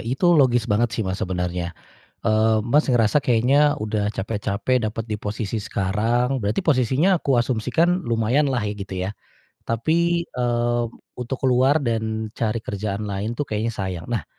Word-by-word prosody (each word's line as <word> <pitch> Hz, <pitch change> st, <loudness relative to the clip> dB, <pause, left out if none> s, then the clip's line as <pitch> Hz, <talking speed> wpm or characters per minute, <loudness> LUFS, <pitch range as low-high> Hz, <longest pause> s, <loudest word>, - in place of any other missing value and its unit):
itu 130 Hz, +9 st, -3 dB
logis 125 Hz, -7 st, +4 dB
banget 115 Hz, +1 st, +1 dB
sih 110 Hz, -, 0 dB
Mas 95 Hz, 0 st, -3 dB
sebenarnya, 90 Hz, -2 st, -3 dB, 0.5 s
eee, 110 Hz, 0 st, +3 dB
Mas, 150 Hz, +5 st, +4 dB
ngerasa 120 Hz, +4 st, +3 dB
kayaknya 135 Hz, +5 st, +3 dB
udah 105 Hz, -1 st, -1 dB
capek-capek 105 Hz, +4 st, -1 dB
dapat 115 Hz, 0 st, -5 dB
di 105 Hz, -, -2 dB
posisi 105 Hz, +1 st, -4 dB
sekarang. 110 Hz, +6 st, 0 dB
Berarti 105 Hz, -, 0 dB
posisinya 150 Hz, -, +2 dB
aku 135 Hz, -6 st, +1 dB
asumsikan 130 Hz, -, +1 dB
lumayanlah 120 Hz, +4 st, +1 dB
ya 105 Hz, -, -2 dB
gitu 100 Hz, -1 st, -7 dB
ya? -, -, -3 dB, 0.6 s
Tapi, 170 Hz, +9 st, +1 dB
eee, 120 Hz, -1 st, 0 dB, 0.4 s
untuk 125 Hz, +2 st, -3 dB
keluar 130 Hz, +4 st, +3 dB
dan 110 Hz, -2 st, -2 dB
cari 110 Hz, -1 st, -2 dB
kerjaan 100 Hz, 0 st, -3 dB
lain 105 Hz, +3 st, -3 dB
tuh 145 Hz, -, -1 dB
kayaknya 110 Hz, -2 st, -2 dB
sayang. 95 Hz, -4 st, -4 dB
Nah, 115 Hz, -9 st, -2 dB
115 Hz, 150 wpm, -22 LUFS, 105-130 Hz, 0.6 s, logis